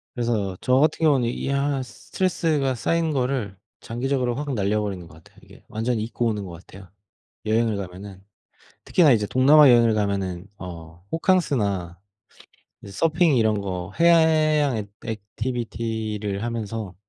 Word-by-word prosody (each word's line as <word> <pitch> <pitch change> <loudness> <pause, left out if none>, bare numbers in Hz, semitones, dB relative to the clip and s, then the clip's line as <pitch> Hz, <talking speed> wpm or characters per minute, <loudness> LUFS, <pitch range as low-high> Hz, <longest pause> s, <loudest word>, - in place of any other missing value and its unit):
그래서 110 -6 -1
저 125 - +2
같은 155 +2 +2
경우는 135 -6 +3
이 120 - -4
한 140 -1 0
스트레스가 150 -1 -1
쌓인 165 +6 0
거를 125 -7 -2 0.3
장기적으로 125 +1 -2
확 145 0 -3
날려버리는 100 -4 -2
것 80 - -16
같아요, 80 - -20
이게. - - -17
완전히 110 0 -2
잊고 120 +1 -3
오는 105 -3 -2
것 90 - -8
같아요, 90 +2 -13 0.6
여행을 110 -1 +1
가면은. 95 0 -8 0.6
특히나 160 -7 +4
이제 105 -3 +1
동남아 140 +5 +6
여행을 120 -2 +5
가면은 100 -3 -2
어 85 -1 -10
호캉스나 105 - 0 0.8
이제 100 - -10
서핑 160 - +2
이런 110 -3 +2
거 95 -1 -5
해양 155 -5 +4
액 105 -1 -5 0.2
액티비티를 110 -2 -4
하면서 115 -4 -4
115 Hz, 320 characters per minute, -23 LUFS, 100-140 Hz, 0.8 s, 동남아